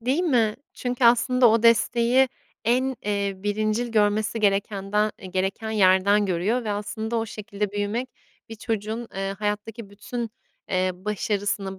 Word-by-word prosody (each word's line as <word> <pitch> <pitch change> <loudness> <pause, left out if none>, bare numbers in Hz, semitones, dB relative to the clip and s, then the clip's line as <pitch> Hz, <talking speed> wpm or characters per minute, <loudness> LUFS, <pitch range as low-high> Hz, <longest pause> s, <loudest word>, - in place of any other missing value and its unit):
Değil 260 +8 +1
mi? 235 -10 +2 0.2
Çünkü 245 0 -2
aslında 245 +1 +5
o 225 +1 +2
desteği 235 +3 +4 0.4
en, 255 +3 +1
eee, 200 -1 0
birincil 215 +4 -1
görmesi 215 0 +1
gerekenden 200 +1 +1
eee, - - -10
gereken 195 +4 -2
yerden 200 0 +4
görüyor 195 +7 0
ve 215 - -2
aslında 215 +2 -3
o 225 0 -1
şekilde 205 -1 -4
büyümek 205 +5 -2 0.4
bir 225 - -7
çocuğun, 225 +1 -4
eee, 195 0 -3
hayattaki 210 +1 -4
bütün, 230 +3 -5 0.4
eee, 185 0 +1
başarısını, 200 0 -2
215 Hz, 140 wpm, -24 LUFS, 200-235 Hz, 0.4 s, aslında